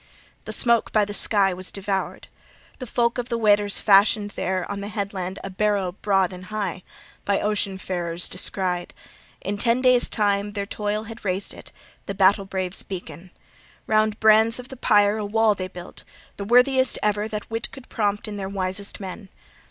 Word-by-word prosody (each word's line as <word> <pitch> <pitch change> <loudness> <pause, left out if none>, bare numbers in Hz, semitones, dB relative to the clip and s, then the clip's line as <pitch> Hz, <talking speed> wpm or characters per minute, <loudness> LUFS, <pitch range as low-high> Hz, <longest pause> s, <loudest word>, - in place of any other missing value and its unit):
The - - -5
smoke 235 -1 +3
by 215 -1 +3
the 205 - -7
sky 200 -2 +3
was 185 +1 -5
devoured. 195 -1 -3 0.5
The 255 - -6
folk 235 +1 0
of 245 0 -4
the 235 - -1
Weders 205 -2 +3
fashioned 205 0 +4
there 185 -2 -2
on 200 0 -5
the 200 - -5
headland 195 -3 -4
a 195 - -5
barrow 200 -1 0
broad 195 -1 0
and 180 0 -10
high, 200 -3 -4 0.4
by 200 -1 +1
ocean 205 -2 -1
farers 175 -2 -3
far - - -12
descried: 180 -1 -2 0.5
in 205 +1 -4
ten 235 +3 +2
days' 255 -1 +4
time 205 -1 0
their 200 -1 -3
toil 210 +1 -3
had 225 +1 -10
raised 190 0 -2
it, - - -12 0.4
the 200 - -4
battle 195 +1 +4
brave's 190 -1 -3
beacon. 180 -2 -8 0.6
Round 215 0 +1
brands 220 +1 +5
of 250 0 -7
the 265 - -8
pyre 210 -3 +3
a - - -3
wall 220 +1 +3
they 185 -2 -5
built, 180 -1 -11 0.3
the 200 - -5
worthiest 250 +2 +4
ever 210 0 0
that 215 0 -6
wit 225 +1 -3
could 265 -2 -12
prompt 205 -2 -1
in 210 -1 -6
their 195 -1 -4
wisest 195 +1 -1
men. 195 +1 -8
205 Hz, 185 wpm, -23 LUFS, 190-215 Hz, 0.6 s, brands